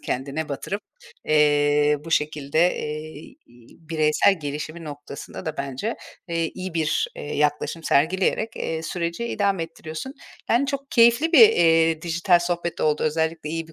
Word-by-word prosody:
kendine 140 +4 -3
batırıp, 195 +8 -4 0.4
eee, 150 -1 +3
bu 165 - -8
şekilde, 150 +2 +1
eee, 155 0 -7 0.5
bireysel 160 +3 +2
gelişimi 150 +3 -5
noktasında 145 +3 -9
da 160 - -3
bence, 140 - -3 0.3
eee, 165 -1 -1
iyi 185 -2 -6
bir, 155 -1 0
eee, 145 - -5
yaklaşım 150 +3 0
sergileyerek, 185 +9 +1
eee, 160 0 -3
süreci 170 +5 -3
idame 200 -6 0
ettiriyorsun. 165 - -7 0.4
Yani, 245 +4 +3
çok 275 -1 -4
keyifli 235 +7 +4
bir, 435 +5 +9
eee, 165 - +3
dijital 175 +1 +2
sohbet 175 -1 -3
oldu, 150 -1 +1
özellikle 160 0 -1
iyi 165 0 -4
bir 165 - -15
160 Hz, 140 wpm, -23 LUFS, 150-180 Hz, 0.5 s, bir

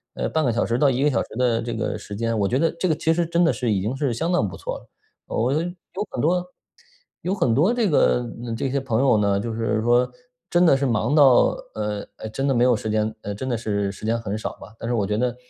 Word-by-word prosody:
呃， - - -1
半 160 - 0
个 125 - +2
小 115 - 0
时 115 - -1
到 145 - +5
1 130 +1 0
个 150 - +3
小 125 - +1
时 - - -6
的 120 -2 +2
这 120 0 -4
个 115 - -2
时 105 0 -8
间， 115 +1 -1
我 100 - +2
觉 125 - +1
得 165 +2 +2
这 185 - +1
个 155 - +2
其 160 +2 +1
实 170 +1 +1
真 170 +1 +2
的 165 - +3
是 120 -1 -1
已 100 - +1
经 110 +7 -2
是 135 -1 -1
相 165 +10 -1
当 110 - +2
不 85 -4 -8
错 - - -5
了。 - - -22 0.4
我 120 +3 0
有 150 - +2 0.5
很 - - -5
多 175 +5 +2 0.8
有 185 +3 -1
很 125 - +2
多 165 - +4
这 235 -4 +1
个 125 -4 +3 0.3
这 130 - -2
些 140 - +1
朋 125 -4 -1
友 135 -4 +4
呢， 100 -1 +2
就 115 +2 -3
是 110 -1 0
说 120 +1 +3 0.4
真 175 +1 +4
的 160 - +6
是 140 - -3
忙 115 +4 0
到， 135 -5 +6 0.2
呃， 105 -1 -3
呃 - - -6
真 135 +6 -2
的 135 - +2
没 120 - +3
有 125 -1 +4
时 110 - -4
间， 110 0 0
呃， 100 0 -5
真 130 +6 -5
的 120 - 0
是 100 -3 -1
时 100 - -14
间 115 +1 +1
很 105 -3 -4
少 110 - -4
吧。 105 - -12
但 115 - -4
是 120 - +1
我 105 -4 +1
觉 105 +1 -1
得 125 +1 0
120 Hz, 295 characters per minute, -23 LUFS, 110-140 Hz, 0.8 s, 的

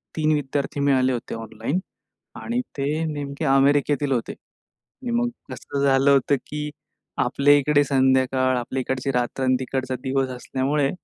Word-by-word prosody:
3 155 -1 +1
विद्यार्थी 145 0 -2
मिळाले 130 -2 +3
होते 120 -1 -5
ऑनलाईन 115 - -3 0.6
आणि 235 +1 -2 0.2
ते 140 - -1 0.2
नेमके 145 -1 -4
अमेरिकेतील 140 +1 +3
होते. 120 -3 -1
आणि 250 -3 -12
मग 240 - 0 0.2
कसं 140 +2 -4
झालं 135 0 +4
होतं 140 +1 +3
की 150 0 -4 0.5
आपल्या 145 +1 +4
इकडे 145 +1 +3
संध्याकाळ, 130 -1 +2
आपल्या 120 +2 -3
इकडची 130 +1 -2
रात्र 125 +1 -1
आणि 130 0 +3
तिकडचा 130 0 -3
दिवस 135 0 0
असल्यामुळे, 135 +3 -1
135 Hz, 140 wpm, -23 LUFS, 130-145 Hz, 0.6 s, झालं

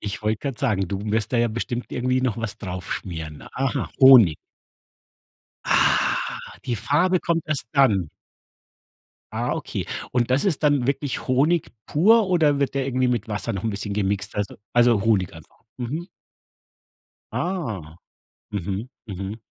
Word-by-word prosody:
Ich 100 -1 -5
wollte 110 0 0
grad 130 -3 -6
sagen, 105 -9 +1
du 95 +2 -3
wirst 110 +3 0
da 120 - +2
ja 120 - +3
bestimmt 120 +2 -4
irgendwie 130 +1 0
noch 125 -5 0
was 115 -2 -4
drauf 90 -4 -5
schmieren. 80 -4 -6
Aha, 135 0 -1
Honig. 125 - +8 1.3
Ah, - - +3 0.5
die 120 - 0
Farbe 150 - +2
kommt 165 -1 0
erst 150 -5 -1
dann. 105 - +3 1.2
Ah, - - -1
okay, - - -4 0.3
und 125 0 +1
das 130 +7 +2
ist 175 -7 0
dann 145 -4 +3
wirklich 140 0 -2
Honig 145 +6 +2 0.2
pur 210 +7 +4
oder 155 -6 +3
wird 140 - 0
der 135 -1 0
irgendwie 130 -1 +1
mit 120 -2 -1
Wasser 105 -1 -2
noch 95 +1 -4
'n 110 - +1
bisschen 105 0 -4
gemixt, 100 0 -1
weißt 105 -1 -2
du - - -11 0.2
also 120 -4 +4
Honig 105 -5 +2
einfach. 80 -2 -15 0.2
Mhm. 145 +8 -4 1.3
Ah. 115 - -3 0.5
Mhm. 100 +3 -3 0.2
Mhm. 100 +1 -5
120 Hz, 155 wpm, -23 LUFS, 100-140 Hz, 1.3 s, Honig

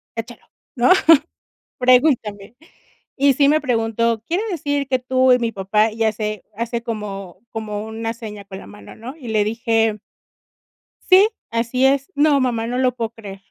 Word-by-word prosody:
echálo, 230 0 -7 0.3
¿no?, 240 +5 +2 0.9
pregúntame". 245 -5 +2 0.6
Y 280 0 +4
sí 280 +1 +3
me 310 +1 +3
preguntó: 230 -2 0
"Quiere 360 +6 -1
decir 285 -5 -2
que 260 -1 0
tú 255 +1 +2
y 250 - +5
mi 230 -2 -2
papá", 210 +2 +1
y 225 0 -2
hace 215 -2 -2
hace 235 +1 -3
como 195 -5 -6
como 215 -1 -5
una 225 +1 -4
seña 215 -4 -9
con 190 -1 -9
la - - -12
mano, 205 - -13
¿no? 255 +7 -9
Y 255 -7 -10
le 215 -2 +1
dije: 225 -1 0 1.0
"Sí, 390 +3 +5 0.2
así 235 +3 0
es". 275 +5 +1
"No 290 -1 +3
mamá, 235 -3 -1
no 245 - -3
lo 255 -1 +2
puedo 230 -2 -3
creer". 200 -4 -11
230 Hz, 165 wpm, -20 LUFS, 215-260 Hz, 1.0 s, y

